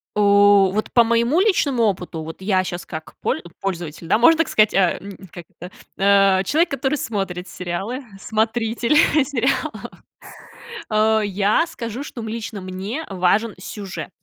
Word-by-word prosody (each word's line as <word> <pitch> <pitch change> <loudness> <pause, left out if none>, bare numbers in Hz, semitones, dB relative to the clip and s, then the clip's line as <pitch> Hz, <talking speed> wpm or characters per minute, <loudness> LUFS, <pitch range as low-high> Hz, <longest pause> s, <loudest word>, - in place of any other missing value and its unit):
У, 200 -1 +5
вот 215 +1 -2
по 235 - +6
моему 235 +7 +2
личному 305 - +2
опыту, 180 -6 -2
вот 160 +3 -9
я 190 -1 +1
щас, 175 0 -5
как 155 -1 -8
поль 160 - -1 0.2
пользователь, 170 -4 -5
да, - - +3
можно 315 +8 +5
так 330 - +1
сказать, 215 0 +3
а, 185 -3 +2
м, 200 -1 -10 0.2
как-то, 175 +1 -11 0.3
а, 195 -1 +4
человек, 320 - +1
который 275 +2 -1
смотрит 195 -7 -4
сериалы, 190 +10 -5 0.2
смотритель 225 +4 0 0.3
сериалов, 260 -2 -2 1.4
э, - - -1
я 205 - +1
скажу, 235 -4 -6
что, 265 - -8
м, 220 - -6
лично 220 -3 -6
мне 195 +11 -5
важен 195 +4 +1
сюжет 195 0 -7
205 Hz, 150 wpm, -21 LUFS, 185-235 Hz, 1.4 s, по